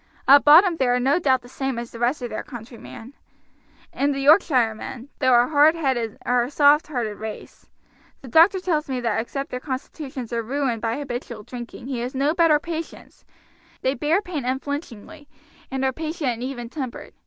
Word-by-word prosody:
At 280 +1 +8
bottom 330 +4 +7
they 265 - +1
are 245 0 +2
no 275 +7 +2
doubt 260 -6 +2
the - - -13
same 270 0 -4
as 235 0 -6
the 230 - -10
rest 250 +3 0
of 240 - -5
their 215 - -3
countrymen, 235 0 -11 0.8
and 280 0 0
the - - -3
Yorkshire 275 - +4
men, 250 +4 -9
though 255 -3 +5
a 240 - +3
hard 305 +2 +5
headed, 260 -8 -1
are 245 0 +2
a 245 - -5
soft 290 +1 +4
hearted 235 -8 -3
race; 220 0 -9 0.5
the - - -9
doctor 330 - +5
tells 320 -5 -1
me 260 -1 -2
that 230 -3 0
except 275 +4 -4
that 250 - -4
their - - -20
constitutions 260 -2 -6
are 230 - 0
ruined 250 -1 -2
by 230 +1 -1
habitual 245 -5 -6
drinking 240 +1 -9
he 260 -2 -4
has 245 +3 -4
no 280 +3 +1
better 330 -3 +4
patients; 325 +1 -8 0.6
they 260 - +2
bear 315 +8 0
pain 330 -8 -4
unflinchingly, 285 +2 -5 0.4
and 265 -1 -2
are 265 - 0
patient 315 -2 -3
and 235 0 -6
even 250 -2 -5
tempered. 255 -1 -7
265 Hz, 195 wpm, -23 LUFS, 240-295 Hz, 0.8 s, At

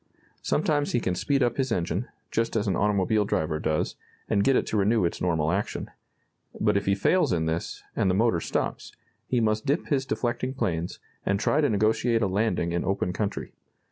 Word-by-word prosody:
Sometimes 145 -1 +1
he 120 - +3
can 90 - -1
speed 135 +9 +1
up 120 -1 0
his 130 -2 0
engine, 90 +3 -1 0.2
just 115 0 0
as 110 -1 +1
an 95 - +1
automobile 105 +2 +2
driver 80 -5 -1
does, 80 0 -1 0.3
and 100 - +2
get 135 +3 +4
it - - +2
to 110 - -1
renew 105 0 +3
its 85 - -2
normal 80 -3 +1
action. 100 +3 -2 0.7
But - - +2
if 100 -1 0
he 100 - +4
fails 180 - +2
in 80 -3 +1
this, 80 +1 -3
and 95 - +2
the 90 - +2
motor 110 -4 +3
stops, - - -3 0.3
he 125 - +1
must 110 +2 0
dip 145 +5 0
his 135 -3 +1
deflecting 125 +2 -2
planes, 85 -8 -2 0.3
and 100 0 +1
try 150 - +2
to 145 - +3
negotiate 110 +2 +2
a - - +2
landing 95 -3 0
in 85 0 -1
open 95 -2 -1
country. 100 0 -3
105 Hz, 200 wpm, -26 LUFS, 90-120 Hz, 0.7 s, get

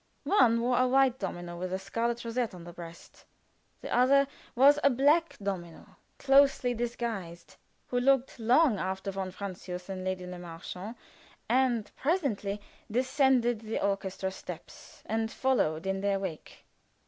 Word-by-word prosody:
One 235 - +4
wore 245 +1 +2
a 255 - +4
white 265 -1 +3
domino 175 -3 -5
with 180 0 -4
a 190 - 0
scarlet 230 +5 -2
rosette 230 -3 -2
on 175 - -10
the 175 0 -10
breast. 170 -1 -12 0.6
The - - -3
other 275 +3 +5 0.3
was 280 +4 +6
a 280 - +6
black 290 +6 +3
domino, 185 -5 -6 0.2
closely 275 -2 +4
disguised, 230 -7 -4 0.3
who 245 - -1
looked 265 0 +2
long 240 - +4
after 190 +1 -3
von 190 -1 -4
Francius 185 -1 -7
and 190 -1 -4
Lady 185 -1 -3
Le 180 0 -7
Marchant, 180 +5 -8 0.5
and 245 -3 +1
presently 260 - -1 0.3
descended 255 -1 +2
the 220 0 -3
orchestra 195 -1 -2
steps 180 -3 -10
and 225 +1 -1
followed 190 -11 0
in 195 0 -1
their 200 0 +1
wake. 185 -5 -7
220 Hz, 145 wpm, -29 LUFS, 185-255 Hz, 0.6 s, was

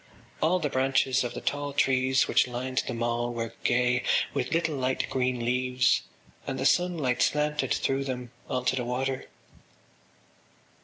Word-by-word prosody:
All 165 +4 +3
the 160 -4 -1
branches 135 -1 +2
of 120 - -4
the - - -5
tall 145 0 -2
trees 130 -2 +2
which - - +3
lined 130 +1 -2
the 125 - -2
mall 120 +1 -1
were 115 -1 -4
gay 125 +1 +2 0.3
with 125 - -2
little 160 -2 +1
light 130 -1 -1
green 125 -2 0
leaves 125 +1 +2 0.5
and 135 - -2
the 135 - -1
sunlight 155 -8 +2
slanted 150 -2 +1
through 135 0 0
them 125 -2 -5 0.2
on 125 -2 -2
to - - +2
the 125 - -1
water. 130 +2 -2
130 Hz, 155 wpm, -27 LUFS, 125-135 Hz, 0.5 s, All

